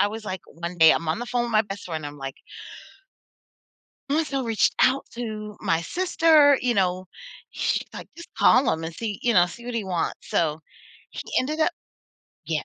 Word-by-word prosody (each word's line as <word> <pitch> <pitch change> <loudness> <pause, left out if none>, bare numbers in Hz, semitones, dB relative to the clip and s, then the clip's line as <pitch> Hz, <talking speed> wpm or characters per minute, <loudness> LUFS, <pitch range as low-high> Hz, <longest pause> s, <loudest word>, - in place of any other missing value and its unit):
I - - +5
was, 220 +1 -7
like, 185 -3 -4
one 170 +1 -7
day 160 0 +8
I'm 165 - +1
on 160 +5 0
the 240 - -5
phone 245 0 0
with 240 - -3
my 215 - +5
best 200 -1 -8
friend. 155 -4 -5
I'm, 145 0 -9
like 135 -1 -7 1.7
“must 305 0 0
have 270 -2 -1
reached 225 -2 +1
out 265 +2 +3
to 215 -3 -6
my 165 0 +1
sister,” 315 - +4
you 245 -1 +1
know, 185 -2 0 0.4
she's - - -2
like, - - -8
“Just 340 +1 -11
call 255 0 +4
him 160 0 -2
and 165 0 -6
see,” 215 -1 -4
you 240 - +2
know, 175 -3 +5
“See 235 +7 -11
what 245 -1 -5
he 225 - -1
wants.” 180 -3 -3
So 155 -1 0 0.5
he - - -7 0.2
ended 305 +5 -2
up - - +2 0.7
Yeah. 155 -1 -2
210 Hz, 200 wpm, -24 LUFS, 170-245 Hz, 1.7 s, day